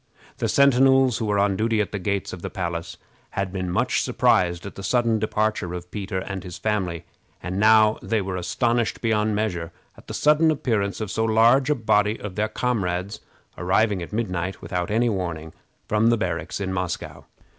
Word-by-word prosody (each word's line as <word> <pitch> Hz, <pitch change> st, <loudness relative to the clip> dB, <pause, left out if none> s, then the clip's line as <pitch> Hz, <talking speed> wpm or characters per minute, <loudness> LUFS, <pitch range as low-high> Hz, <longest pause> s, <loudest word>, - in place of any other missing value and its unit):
The -, -, 0 dB
sentinels 135 Hz, -2 st, +4 dB
who 115 Hz, -, -1 dB
were 105 Hz, -1 st, +1 dB
on 100 Hz, -1 st, +2 dB
duty 110 Hz, +1 st, +1 dB
at 105 Hz, -, -1 dB
the 100 Hz, -, -3 dB
gates 100 Hz, +1 st, -2 dB
of 90 Hz, -, -8 dB
the -, -, -4 dB
palace 85 Hz, -2 st, -4 dB, 0.4 s
had 100 Hz, -1 st, -1 dB
been 95 Hz, -2 st, -3 dB
much 90 Hz, -, +1 dB
surprised 85 Hz, -1 st, +2 dB
at 100 Hz, -, -7 dB
the -, -, -9 dB
sudden 115 Hz, +2 st, +1 dB
departure 105 Hz, -4 st, -1 dB
of 90 Hz, 0 st, -8 dB
Peter 95 Hz, -2 st, -4 dB
and 95 Hz, 0 st, -4 dB
his 90 Hz, -2 st, -8 dB
family, 95 Hz, -6 st, -2 dB, 0.4 s
and 90 Hz, +3 st, -3 dB
now 110 Hz, 0 st, +5 dB
they 110 Hz, -1 st, 0 dB
were 95 Hz, -1 st, -3 dB
astonished 115 Hz, +6 st, 0 dB
beyond 110 Hz, -2 st, +1 dB
measure 90 Hz, -6 st, -2 dB, 0.2 s
at -, -, -18 dB
the -, -, -5 dB
sudden 150 Hz, +2 st, +4 dB
appearance 110 Hz, -, -1 dB
of 105 Hz, -2 st, -3 dB
so 110 Hz, -, 0 dB
large 115 Hz, +5 st, +4 dB
a 150 Hz, -, +3 dB
body 110 Hz, -2 st, +1 dB
of 105 Hz, -3 st, -6 dB
their 105 Hz, +2 st, -1 dB
comrades 100 Hz, -5 st, -2 dB, 0.4 s
arriving 100 Hz, +2 st, +1 dB
at 85 Hz, -, -7 dB
midnight, 95 Hz, -4 st, -2 dB
without 90 Hz, -1 st, -3 dB
any 115 Hz, +3 st, +2 dB
warning, 85 Hz, -6 st, -3 dB, 0.3 s
from 110 Hz, +2 st, +2 dB
the 120 Hz, 0 st, +4 dB
barracks 85 Hz, -6 st, -3 dB
in 95 Hz, -1 st, -3 dB
Moscow. 90 Hz, -2 st, -4 dB
105 Hz, 190 wpm, -24 LUFS, 90-110 Hz, 0.4 s, now